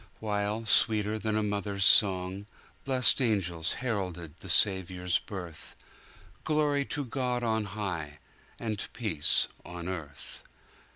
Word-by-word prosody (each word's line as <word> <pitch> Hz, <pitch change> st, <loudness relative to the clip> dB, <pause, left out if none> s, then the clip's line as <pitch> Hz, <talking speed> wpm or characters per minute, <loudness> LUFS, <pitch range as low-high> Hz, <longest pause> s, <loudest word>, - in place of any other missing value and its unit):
While, 105 Hz, +1 st, -2 dB
sweeter 110 Hz, 0 st, +3 dB
than 110 Hz, +1 st, -1 dB
a 110 Hz, -, 0 dB
mother's 100 Hz, -1 st, -1 dB
song, 95 Hz, 0 st, +3 dB, 0.4 s
Blest 130 Hz, 0 st, +4 dB
angels 90 Hz, -8 st, 0 dB
heralded 90 Hz, -, -4 dB
the 95 Hz, -, -7 dB
Saviour's 90 Hz, -2 st, +3 dB
birth, 90 Hz, -6 st, -9 dB, 0.7 s
Glory 150 Hz, -2 st, +1 dB
to 145 Hz, -1 st, -4 dB
God 125 Hz, -1 st, -2 dB
on 110 Hz, -2 st, 0 dB
high! 90 Hz, -7 st, -5 dB, 0.4 s
And 110 Hz, -3 st, -3 dB
peace 85 Hz, -11 st, +1 dB, 0.2 s
on 85 Hz, 0 st, -8 dB
earth. 80 Hz, -6 st, -8 dB
100 Hz, 115 wpm, -29 LUFS, 90-110 Hz, 0.7 s, Blest